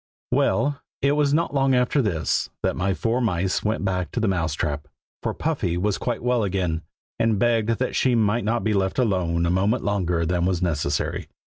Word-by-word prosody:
WELL, 145 0 +2 0.2
it 140 - +4
was 145 -1 +2
not 155 -1 +1
long 135 -2 +3
after 125 +3 +2
this 90 -9 0
that - - +1
my 95 +2 0
four 115 +6 0
mice 95 -5 0
went 105 -1 -1
back 90 -3 -1
to - - -3
the 110 - +1
Mouse 85 -5 0
trap, 75 -2 -3 0.3
for - - -1
Puffy 115 - -1
was 100 +2 0
quite 120 -2 -2
well 125 -2 +2
again, 90 -5 -1 0.4
and 115 -2 +2
begged 115 0 +2
that 125 - -2
she 130 -2 +3
might 115 +1 +2
not 115 +2 0
be 110 - +1
left 95 -1 0
alone 90 -8 +1
a 85 - +1
moment 100 +6 +1
longer 90 -5 0
than 85 +1 0
was 90 -1 +1
necessary. 75 -4 -1
100 Hz, 195 wpm, -24 LUFS, 90-120 Hz, 0.4 s, it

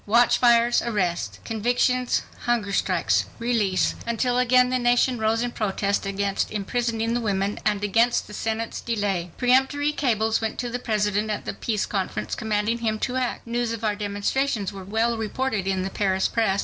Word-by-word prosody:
Watchfires—arrests—convictions—hunger 235 0 +1
strikes—release—until 205 - 0
again 250 0 +4
the 255 0 +1
nation 245 0 +2
rose 220 +1 +1
in 245 - -2
protest 200 -2 -1
against 200 0 -1
imprisoning 230 +2 -1
the 240 - +1
women 200 -2 -1
and 205 -1 +1
against 230 +4 +2
the 210 - -12
Senate's 225 +2 -3
delay. 205 -6 -1
Peremptory 265 +4 +2
cables 225 -7 +1
went 220 -1 -3
to 245 -1 -3
the 245 - -2
President 210 -2 0
at 210 - -3
the - - -3
Peace 215 -3 -2
Conference, 185 - -3
commanding 220 +1 -1
him 220 -2 -1
to 250 +3 -2
act. 255 -1 -2
News 235 0 -1
of 230 -1 -6
our 210 -1 +1
demonstrations 205 +2 -1
were 195 -1 -8
well 225 +4 0
reported 220 -2 -2
in 190 -1 0
the 190 - -4
Paris 190 -2 +1
press. 215 -4 +1
220 Hz, 150 wpm, -24 LUFS, 200-240 Hz, -, again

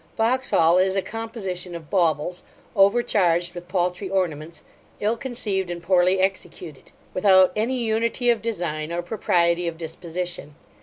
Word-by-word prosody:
Vauxhall 225 -8 +3
is 190 +1 +2
a 195 - 0
composition 195 -6 -5
of 160 -3 -10
baubles, 175 -1 +1 0.3
overcharged 195 -5 +3
with 175 -1 -9
paltry 180 +1 -1
ornaments, 165 -4 -2 0.4
ill 215 +3 +1
conceived, 220 -7 -3
and 175 -1 -6
poorly 185 +1 +3
executed; 185 -5 -4 0.2
without 190 -1 +5
any 235 +5 0
unity 230 +1 +1
of 230 -2 -1
design, 170 -8 -3
or 175 +1 -2
propriety 175 -3 +1
of 165 -1 -4
disposition. 170 -1 -6
185 Hz, 135 wpm, -23 LUFS, 170-210 Hz, 0.4 s, without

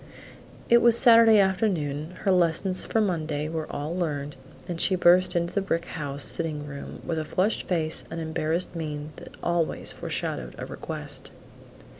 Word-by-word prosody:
It 235 - +6
was 235 -1 +5
Saturday 230 -3 +7
afternoon; 180 -6 0
her 200 - +2
lessons 180 +1 +2
for 225 - 0
Monday 160 -7 -1
were 160 -1 -4
all 150 +4 -4
learned 145 -5 -3 0.3
and 170 -2 -3
she 190 - +4
burst 180 +1 +5
into 170 0 -1
the 200 - +1
brick 170 -3 -1
house 145 -4 -3
sitting 155 -3 0
room 140 -1 -8
with 165 -2 -2
the - - -2
flushed 185 +7 -1
face 160 -3 +1
and 165 - -5
embarrassed 160 +2 -2
mien 150 -2 -5
that - - -10
always 170 -2 -1
foreshadowed - - -4
a - - -5
request. - - -7
170 Hz, 160 wpm, -26 LUFS, 155-185 Hz, 0.3 s, Saturday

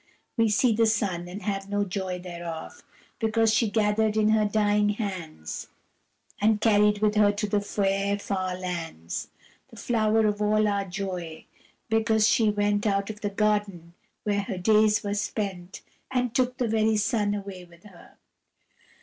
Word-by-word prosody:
We 230 -2 +3
see 225 +3 +3
the 225 +1 +3
sun, 195 -5 -1
and 185 +3 -8
have 195 0 -3
no 205 0 0
joy 185 -1 -3
thereof, 175 - -7 0.4
Because 225 0 +2
she 220 +1 +2
gathered 215 +1 +1
in 215 0 +3
her 215 -1 +3
dying 210 0 +2
hands 185 - -5 0.7
And 215 0 +3
carried 210 -1 +3
with 210 -1 +3
her 210 -1 +4
to 210 +1 -2
the 205 0 +1
fair 200 0 0
far 185 -2 -3
lands 165 - -5 0.4
The - - -16
flower 220 -2 +1
of 210 0 0
all 215 0 +3
our 200 -1 0
joy, 180 -4 -5 0.4
because 220 -1 +2
she 220 0 +3
went 205 0 +1
Out 200 +1 0
of 210 - -13
the 205 - -1
garden 200 -5 -1 0.3
where 205 -1 0
her 195 -1 -5
days 210 +2 +3
were 205 0 -2
spent, 195 -3 -4 0.3
And 250 -2 -1
took 255 0 +1
the 245 - 0
very 220 0 +2
sun 210 -1 +1
away 195 -3 -7
with 170 0 -20
her. 190 -4 -17
205 Hz, 160 wpm, -26 LUFS, 195-215 Hz, 0.7 s, her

